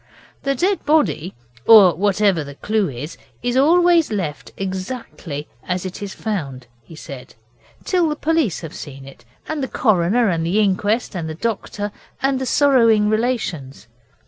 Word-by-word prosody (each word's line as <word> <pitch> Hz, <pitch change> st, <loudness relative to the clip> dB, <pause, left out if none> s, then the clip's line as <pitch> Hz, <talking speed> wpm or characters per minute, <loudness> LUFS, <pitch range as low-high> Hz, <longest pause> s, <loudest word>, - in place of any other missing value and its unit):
'The 275 Hz, 0 st, 0 dB
dead 380 Hz, +8 st, 0 dB
body, 290 Hz, -, +1 dB, 0.3 s
or 205 Hz, -6 st, +9 dB
whatever 195 Hz, -1 st, +2 dB
the 140 Hz, -1 st, -10 dB
clue 210 Hz, +3 st, 0 dB
is, 145 Hz, +6 st, -7 dB, 0.3 s
is 245 Hz, 0 st, 0 dB
always 335 Hz, +3 st, +4 dB
left 170 Hz, -8 st, -4 dB
exactly 185 Hz, -, -5 dB, 0.2 s
as 180 Hz, 0 st, -2 dB
it 185 Hz, +1 st, -6 dB
is 200 Hz, -1 st, -5 dB
found,' 145 Hz, -, -4 dB, 0.2 s
he 140 Hz, +8 st, -14 dB
said, 135 Hz, -4 st, -10 dB, 0.5 s
'till 355 Hz, -4 st, +1 dB
the 300 Hz, -, -1 dB
police 310 Hz, -, 0 dB
have 160 Hz, -3 st, -8 dB
seen 135 Hz, -2 st, -9 dB
it, 125 Hz, -3 st, -15 dB, 0.2 s
and 310 Hz, -2 st, -3 dB
the 265 Hz, -, -1 dB
coroner, 215 Hz, +1 st, +2 dB
and 165 Hz, -4 st, 0 dB
the 175 Hz, +6 st, +1 dB
inquest, 205 Hz, +3 st, +1 dB
and 165 Hz, -3 st, -3 dB
the 155 Hz, -, -5 dB
doctor, 205 Hz, 0 st, -3 dB, 0.3 s
and 270 Hz, -1 st, +1 dB
the 260 Hz, -, -2 dB
sorrowing 230 Hz, -8 st, +4 dB
relations. 215 Hz, -, -2 dB
205 Hz, 155 wpm, -20 LUFS, 165-255 Hz, 0.5 s, or